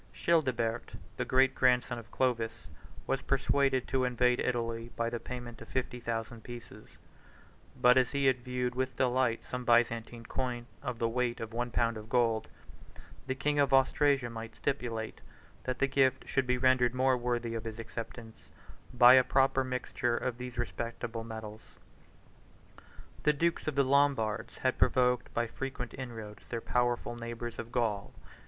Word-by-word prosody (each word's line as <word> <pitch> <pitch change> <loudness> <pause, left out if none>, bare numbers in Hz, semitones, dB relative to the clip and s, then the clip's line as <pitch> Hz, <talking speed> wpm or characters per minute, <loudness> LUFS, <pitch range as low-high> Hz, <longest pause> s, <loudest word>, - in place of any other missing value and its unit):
Childebert, 130 -9 0 0.2
the - - -1
great 130 0 +4
grandson 125 -1 +2
of 115 0 -13
Clovis, 115 -4 -1 0.4
was 135 - -1
persuaded 135 -1 +1
to 130 -1 +1
invade 125 0 +2
Italy 115 -2 -1
by 115 0 -1
the 120 - -3
payment 120 -1 -7
of 115 - -10
fifty 125 -1 -3
thousand 115 0 -4
pieces; 120 -3 -11 0.8
but, 125 +1 +6
as 125 - +2
he 140 -1 0
had 130 -1 +4
viewed 125 -1 -2
with 130 0 -2
delight 125 -2 +1
some 125 0 -5
Byzantine 120 -1 +2
coin 125 -1 -3 0.2
of 125 -4 -4
the 115 - +1
weight 120 +1 -1
of 115 0 -6
one 120 +1 -1
pound 115 -1 0
of 110 +1 -10
gold, 115 -3 +2 0.8
the 130 - -1
king 145 +2 0
of 140 -1 +3
Austrasia 135 -1 +3
might 115 0 -7
stipulate, 115 -5 -3 0.4
that 130 0 -2
the - - +3
gift 135 -1 +2
should 135 -2 0
be 125 0 +2
rendered 125 -1 +3
more 130 0 +3
worthy 120 -1 -2
of 115 -1 -4
his 110 -1 -5
acceptance, 115 0 -8 0.4
by 125 0 +8
a 130 -1 +7
proper 135 +1 +3
mixture 125 -1 -1
of 125 -1 -3
these 125 -1 -7
respectable 120 -1 -4
medals. 110 -1 -7 1.6
The 150 - +3
dukes 170 +3 0
of 155 - -1
the 140 - +4
Lombards 130 -5 +1
had 130 -1 0
provoked 125 -1 +2
by 120 - +1
frequent 125 +1 -5
inroads 110 -5 -8
their 115 - -2
powerful 120 0 0
neighbors 120 0 -6
of 115 - -6
Gaul. 110 -5 -1
125 Hz, 160 wpm, -31 LUFS, 115-130 Hz, 1.6 s, by